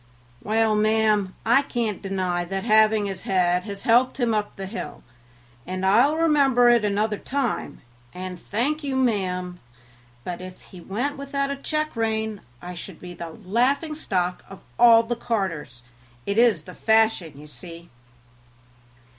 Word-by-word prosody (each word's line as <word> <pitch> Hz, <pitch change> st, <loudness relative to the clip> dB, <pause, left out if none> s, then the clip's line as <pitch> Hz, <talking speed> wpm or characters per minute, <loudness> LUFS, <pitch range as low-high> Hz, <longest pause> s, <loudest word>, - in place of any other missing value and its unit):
"Well, 220 Hz, +1 st, +1 dB
ma'am, 215 Hz, -2 st, +2 dB
I 240 Hz, +5 st, +5 dB
can't 235 Hz, -7 st, -3 dB
deny 185 Hz, -3 st, -1 dB
that 195 Hz, +2 st, -4 dB
having 215 Hz, -1 st, +4 dB
his 195 Hz, -2 st, -4 dB
head 180 Hz, -1 st, +1 dB
has 200 Hz, -2 st, -7 dB
helped 250 Hz, +3 st, +3 dB
him 235 Hz, -3 st, +1 dB
up 210 Hz, -1 st, -2 dB
the 195 Hz, -, -6 dB
hill, 210 Hz, +5 st, -7 dB, 0.6 s
and 185 Hz, +1 st, -3 dB
I'll 240 Hz, +10 st, +4 dB
remember 280 Hz, -7 st, +4 dB
it 240 Hz, -2 st, +4 dB
another 210 Hz, +1 st, 0 dB
time, 270 Hz, -3 st, -3 dB, 0.3 s
and 180 Hz, 0 st, -7 dB
thank 285 Hz, -, -2 dB
you, 275 Hz, -2 st, -2 dB
ma'am; 185 Hz, -8 st, -1 dB, 0.6 s
but 180 Hz, +3 st, -5 dB
if 185 Hz, 0 st, -9 dB
he 180 Hz, -, -13 dB
went 245 Hz, -, -3 dB
without 280 Hz, 0 st, -2 dB
a -, -, -2 dB
check 305 Hz, +2 st, -2 dB
rein 220 Hz, -2 st, -1 dB, 0.2 s
I 180 Hz, +1 st, -6 dB
should 180 Hz, 0 st, -9 dB
be 180 Hz, -1 st, -9 dB
the 170 Hz, -1 st, -7 dB
laughing 250 Hz, -, 0 dB
stock 180 Hz, -, -2 dB
of 195 Hz, -, -11 dB, 0.2 s
all 230 Hz, -1 st, +7 dB
the 240 Hz, +1 st, -2 dB
carters; 185 Hz, -, -3 dB, 0.4 s
it 200 Hz, +2 st, 0 dB
is 235 Hz, -3 st, +4 dB
the 180 Hz, -, -11 dB
fashion, 220 Hz, -9 st, +2 dB
you 150 Hz, -, -11 dB
see." 170 Hz, +2 st, -11 dB
215 Hz, 155 wpm, -24 LUFS, 185-240 Hz, 0.6 s, all